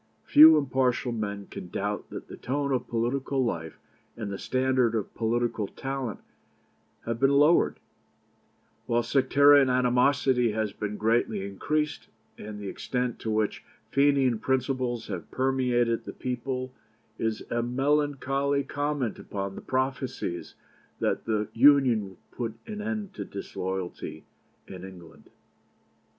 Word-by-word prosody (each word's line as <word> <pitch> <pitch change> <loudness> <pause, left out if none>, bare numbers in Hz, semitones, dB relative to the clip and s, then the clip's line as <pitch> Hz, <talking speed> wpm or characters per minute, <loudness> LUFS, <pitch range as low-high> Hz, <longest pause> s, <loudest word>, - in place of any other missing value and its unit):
Few 155 +1 +9
impartial 130 -3 +1
men 100 -3 -4
can 90 - -9
doubt 105 +3 -3
that - - -8
the - - -9
tone 140 +2 -2
of 125 -2 -1
political 130 +3 0
life 80 -7 -4 0.4
and 110 -3 -4
the 100 - -5
standard 130 -2 +1
of 110 - -3
political 115 -2 -1
talent 135 -4 -5 0.8
have 115 0 -2
been 135 - +4
lowered, 150 +4 +4 1.1
while 120 0 +2
sectarian 140 +2 +5
animosity 125 -1 +3
has 110 -2 -1
been 105 0 -4
greatly 110 -2 +1
increased, 150 +10 -2 0.3
and 105 0 -8
the 100 - -6
extent 125 +3 -3
to 110 - -4
which 110 -1 0 0.3
Fenian 140 -4 +3
principles 130 -1 -1
have 95 -5 -6
permeated 125 -3 +1
the - - -7
people 130 0 -4 0.5
is 115 -1 -1
a 120 - +1
melancholy 140 +2 +1
comment 145 -4 -2
upon 100 -1 -5
the - - -8
prophesies 130 -8 -3 0.4
that - - -1
the 105 -2 0
Union 130 -3 +6
would 95 - -21
put 115 -3 -4
an 210 -1 -6
end 210 -2 -4
to - - -5
disloyalty 95 -2 -5 0.4
in 95 -1 -9
Ireland." 90 -4 -12
125 Hz, 130 wpm, -27 LUFS, 110-135 Hz, 1.1 s, Few